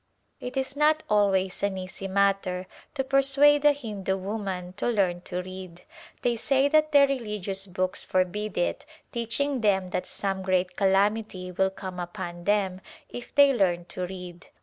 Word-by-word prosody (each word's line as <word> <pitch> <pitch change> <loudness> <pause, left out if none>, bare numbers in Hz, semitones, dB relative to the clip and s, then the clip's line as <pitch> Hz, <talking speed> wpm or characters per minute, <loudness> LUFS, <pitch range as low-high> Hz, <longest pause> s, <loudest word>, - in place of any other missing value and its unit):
It 250 +2 -6
is 265 +1 -2
not 305 +1 +3
always 195 -3 +2
an 200 -1 0
easy 185 +1 -6
matter 195 -1 +1 0.3
to 270 - 0
persuade 275 +2 +4
a 295 - +7
Hindu 210 -9 -3
woman 190 -2 -4
to - - -1
learn 190 -7 +1
to 180 0 -3
read; 185 -1 -9 0.4
they 240 -1 +2
say 270 +4 +2
that 310 0 +3
their 285 -1 +7
religious 210 -7 -3
books 185 0 -1
forbid 185 +3 -1
it, 175 - 0 0.3
teaching 245 +3 -1
them 195 -3 +2
that 180 - -3
some 195 -1 -2
great 185 -1 0
calam 200 +2 +3
ity 185 -4 -8
will 190 +2 +1
come 185 -1 -7
upon 175 -1 -6
them 195 -2 +1 0.3
if 245 0 -9
they 285 -1 +7
learn 175 -6 +1
to 180 -1 -3
read. 180 -1 -9
195 Hz, 165 wpm, -26 LUFS, 185-240 Hz, 0.4 s, a